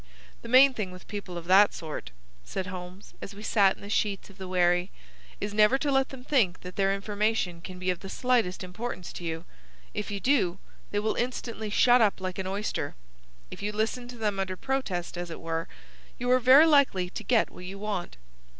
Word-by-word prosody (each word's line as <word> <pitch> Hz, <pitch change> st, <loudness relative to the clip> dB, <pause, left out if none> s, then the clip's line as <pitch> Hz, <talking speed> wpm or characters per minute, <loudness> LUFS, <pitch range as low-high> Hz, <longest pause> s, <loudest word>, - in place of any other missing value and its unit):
"The -, -, -9 dB
main 260 Hz, +2 st, +7 dB
thing 210 Hz, -6 st, -3 dB
with 180 Hz, 0 st, -12 dB
people 200 Hz, -4 st, -6 dB
of 170 Hz, -, -7 dB
that 195 Hz, +3 st, +6 dB
sort," 160 Hz, -3 st, -6 dB, 0.3 s
said 185 Hz, -, -4 dB
Holmes, 185 Hz, +1 st, -8 dB
as 200 Hz, -, -8 dB
we 210 Hz, -, -10 dB
sat 200 Hz, -4 st, +4 dB
in -, -, -16 dB
the 200 Hz, -, -8 dB
sheets 200 Hz, -2 st, -1 dB
of 195 Hz, -, -20 dB
the 190 Hz, -, -6 dB
wherry, 180 Hz, 0 st, +2 dB, 0.5 s
"is 205 Hz, 0 st, -3 dB
never 215 Hz, +5 st, +5 dB
to 285 Hz, +1 st, -1 dB
let 270 Hz, 0 st, +2 dB
them 265 Hz, -2 st, -10 dB
think 235 Hz, -11 st, +1 dB
that 180 Hz, 0 st, -9 dB
their 195 Hz, -1 st, +2 dB
information 200 Hz, -3 st, -1 dB
can 185 Hz, +1 st, -8 dB
be 185 Hz, 0 st, 0 dB
of 180 Hz, -, -4 dB
the 195 Hz, -, -9 dB
slightest 235 Hz, -7 st, +1 dB
importance 185 Hz, +1 st, -6 dB
to -, -, -8 dB
you. 165 Hz, 0 st, -4 dB, 0.5 s
If 210 Hz, -, -3 dB
you 200 Hz, -1 st, -3 dB
do, 195 Hz, -9 st, +2 dB, 0.3 s
they 205 Hz, -, -2 dB
will 215 Hz, +1 st, +1 dB
instantly 235 Hz, -3 st, -3 dB
shut 245 Hz, +3 st, +5 dB
up 210 Hz, -3 st, +3 dB
like 185 Hz, 0 st, -4 dB
an 190 Hz, -, -3 dB
oyster. 200 Hz, +2 st, -3 dB, 0.6 s
If -, -, -8 dB
you 205 Hz, +1 st, -2 dB
listen 220 Hz, +3 st, -2 dB
to 245 Hz, 0 st, -9 dB
them 210 Hz, -3 st, -1 dB
under 190 Hz, -1 st, -2 dB
protest, 185 Hz, -11 st, -2 dB
as 175 Hz, 0 st, -5 dB
it 165 Hz, -, -7 dB
were, 165 Hz, 0 st, -3 dB, 0.5 s
you 245 Hz, +1 st, -1 dB
are 255 Hz, -, +6 dB
very 260 Hz, +5 st, +8 dB
likely 270 Hz, -, +3 dB
to -, -, -6 dB
get 235 Hz, -4 st, +2 dB
what 180 Hz, -, -10 dB
you 190 Hz, +2 st, -7 dB
want." 200 Hz, -4 st, -4 dB
200 Hz, 215 wpm, -28 LUFS, 180-230 Hz, 0.6 s, very